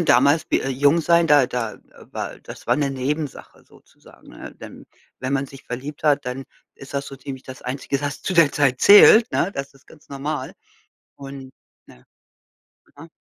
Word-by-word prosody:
damals 140 +3 +4
wie, - - +2
äh 135 - -3
jung 145 +5 +2
sein, 170 +1 +3
da 145 -4 +5
da, 120 -3 -3
äh, - - -19 0.3
war - - -6
das - - -12
war - - +3
'ne 140 -2 0
Nebensache 140 +2 -5
sozusagen, - - -21
ne? - - -11
Denn - - -12 0.3
wenn 130 +1 -4
man 140 0 0
sich 135 0 -14
verliebt 140 +5 -7
hat, 145 -1 +2
dann 125 +2 -5 0.3
ist 135 +1 -12
das 140 0 -2
so 135 - -9
ziemlich 135 0 -8
das 130 0 -11
Einzige, 135 +1 -3
was 145 0 -5
zu - - -2
der 165 -5 +4
Zeit 135 -3 +1
zählt, 220 +3 +8
ne, 185 - 0
das 135 -4 -6
ist 135 - -23
ganz 155 - -19
normal. 140 +2 -5 0.6
Und, 135 -1 -10 0.3
ne 60 - -19 0.9
aha. 165 +3 -12
140 Hz, 185 wpm, -21 LUFS, 130-150 Hz, 0.9 s, zählt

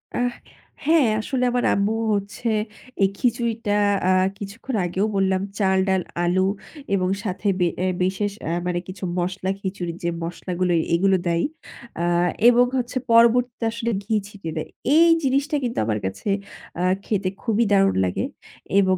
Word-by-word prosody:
আ - - 0 0.7
হ্যাঁ, 315 -5 +5
আসলে 250 +2 -2
আমার 245 0 0
আম্মু 200 +2 +1 0.2
হচ্ছে 205 +3 -2 0.5
এই 190 - +4
খিচুড়িটা 230 -3 0 0.4
আ - - +5 0.3
কিছুক্ষণ 220 +5 -6
আগেও 190 +4 0
বললাম 190 -1 +2 0.2
চাল, 190 -1 +3
ডাল, 190 -1 +2 0.2
আলু 185 +2 +2 0.5
এবং 185 -1 +1
সাথে 205 +1 -3
বে 175 - +3
এ্যা 185 - +1
বিশেষ 195 +2 0
এ্যা 165 - -1
মানে 175 -1 0
কিছু 190 +1 -9 0.2
মসলা 185 +1 -2
খিচুড়ির, 180 -3 -4
যে 170 - +1
মসলাগুলো 175 +1 -2 0.2
এগুলো 190 +2 +3
দেয় 170 0 +1 0.6
আ - - 0 0.5
এবং 245 +1 +5
হচ্ছে 250 +1 -2
পরবর্তীতে 235 +1 +4
আসলে 230 0 -2
ঘি 220 +2 -1
ছিটিয়ে 195 -6 -7
দেয়। 155 - -4 0.3
এই 335 +1 +7
জিনিসটা 280 +3 +1
কিন্তু 240 -1 -3
আমার 105 -2 0
কাছে 95 - -4 0.5
আ - - +1 0.2
খেতে 195 -3 0
খুবই 230 0 +1
দারুন 195 0 +4
লাগে 90 - -1 0.5
এবং 185 -1 +3
200 Hz, 150 wpm, -23 LUFS, 185-235 Hz, 0.7 s, এই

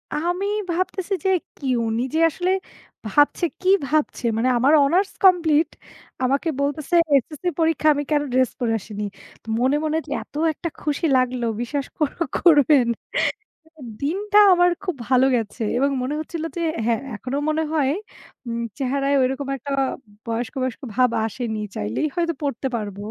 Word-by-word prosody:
আমি 350 +5 -1 0.3
ভাবতেছি 370 +2 -2
যে - - +3 0.3
কি 280 - -10 0.2
উনি 225 +1 -1
যে - - +2
আসলে, 355 +4 -1 0.5
ভাবছে 290 - +2 0.2
কি 370 - +1 0.2
ভাবছে 300 -3 0
মানে 250 +3 +2
আমার 270 +6 +4
হনার্স 360 +8 +2
কমপ্লিট 330 -4 +5 0.5
আমাকে 275 +6 +1
বলতেছে 290 +4 -1 0.2
এসএসসি 300 +6 0
পরীক্ষা 320 -1 +2
আমি 290 0 -2
কেন 295 -1 +3
ড্রেস 255 -1 +3
পরে 230 -2 0
আসিনি। 210 +1 -7 0.6
মনে, 260 +3 +2
মনে 310 0 0
যে - - -9
এত - - -16 0.2
একটা 335 - -5
খুশি 300 +2 -1
লাগলো 250 -1 0 0.2
বিশ্বাস 275 +3 -2
কোরো 305 +3 -1
করবেন। 295 -6 +5 1.1
দিনটা 400 +8 0 0.2
আমার 355 0 +4
খুব 365 -5 -2
ভালো 255 0 +5
গেছে 225 0 -3
এবং 275 +2 +2
মনে 265 +4 -2
হচ্ছিল 315 +1 -5
যে - - -1 0.2
হ্যাঁ, 230 0 +1
এখনো 255 +6 -4
মনে 315 +1 +1
হয় 280 -3 +2 0.6
উম 235 0 -3 0.2
চেহারায় 275 +1 0
ঐরকম 270 +2 -1
একটা 280 +3 -7 0.6
বয়স্ক, 230 0 -3
বয়স্ক, 255 +2 -3
ভাব 255 -1 +4 0.2
আসেনি। 220 0 -3 0.2
চাইলেই 105 - -1
হয়তো 335 -1 0
পড়তে 275 -1 -2
পারব। 205 -3 -4
285 Hz, 150 wpm, -22 LUFS, 250-325 Hz, 1.1 s, কমপ্লিট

